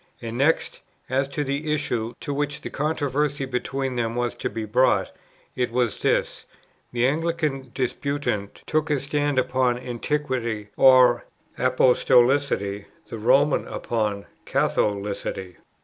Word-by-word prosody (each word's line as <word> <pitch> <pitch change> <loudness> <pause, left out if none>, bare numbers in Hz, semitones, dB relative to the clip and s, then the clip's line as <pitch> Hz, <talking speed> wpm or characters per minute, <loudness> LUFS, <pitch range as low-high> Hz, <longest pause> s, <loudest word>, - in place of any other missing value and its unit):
And 115 -1 -6
next, 140 +6 +1 0.3
as 135 +1 +1
to 145 +2 -3
the 145 +3 -2
issue, 120 -5 -2
to 145 - -3
which 145 0 -2
the - - -7
controversy 145 -1 -1
between 130 0 -3
them 115 -1 -1
was 120 -1 -1
to - - -2
be 110 -1 -4
brought, 125 +5 +2 0.4
it 125 -1 0
was 120 -2 0
this: - - 0 0.4
the 120 0 +1
Anglican 150 -2 -1
disputant 130 -6 -2
took 155 0 0
his 145 -3 0
stand 145 -1 0
upon 130 -1 +2
Antiquity 125 -4 -3
or 125 -2 +6 0.3
Apostolicity, 125 -4 +3 0.2
the 115 - -6
Roman 135 +6 +3
upon 105 -3 -2 0.2
Catholicity. 100 -3 -1
130 Hz, 125 wpm, -24 LUFS, 115-145 Hz, 0.4 s, or